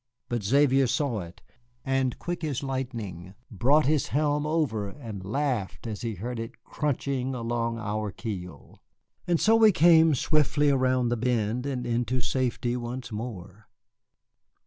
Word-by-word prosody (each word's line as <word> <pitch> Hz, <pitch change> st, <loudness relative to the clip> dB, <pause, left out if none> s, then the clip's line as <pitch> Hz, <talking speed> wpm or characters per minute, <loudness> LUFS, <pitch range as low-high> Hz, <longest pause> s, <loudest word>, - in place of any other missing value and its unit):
But 120 Hz, -2 st, -1 dB
Xavier 135 Hz, +4 st, +4 dB
saw 125 Hz, -3 st, 0 dB
it, 85 Hz, -1 st, -10 dB, 0.4 s
and 135 Hz, -2 st, 0 dB
quick 175 Hz, -1 st, -4 dB
as 145 Hz, -3 st, -2 dB
lightning 115 Hz, -9 st, -5 dB, 0.2 s
brought 140 Hz, +9 st, +3 dB
his 150 Hz, 0 st, +2 dB
helm 145 Hz, +1 st, +1 dB
over 135 Hz, -11 st, 0 dB
and 110 Hz, -5 st, -8 dB
laughed 120 Hz, -1 st, -2 dB
as 110 Hz, -3 st, -5 dB
he 115 Hz, -3 st, -3 dB
heard 120 Hz, +5 st, -5 dB
it 115 Hz, 0 st, -8 dB
crunching 135 Hz, -3 st, -2 dB
along 115 Hz, -1 st, -2 dB
our 105 Hz, -1 st, -2 dB
keel. 90 Hz, -4 st, -7 dB, 0.5 s
And 175 Hz, -2 st, +2 dB
so 220 Hz, +1 st, +5 dB
we 220 Hz, -1 st, +7 dB
came 160 Hz, -2 st, +6 dB
swiftly 145 Hz, +1 st, +2 dB
around 130 Hz, -2 st, +2 dB
the 120 Hz, -, 0 dB
bend 120 Hz, +1 st, 0 dB
and 125 Hz, -3 st, -3 dB
into 120 Hz, +1 st, 0 dB
safety 125 Hz, -1 st, -1 dB
once 125 Hz, 0 st, -5 dB
more. 105 Hz, -3 st, -7 dB
125 Hz, 145 wpm, -27 LUFS, 110-140 Hz, 0.5 s, we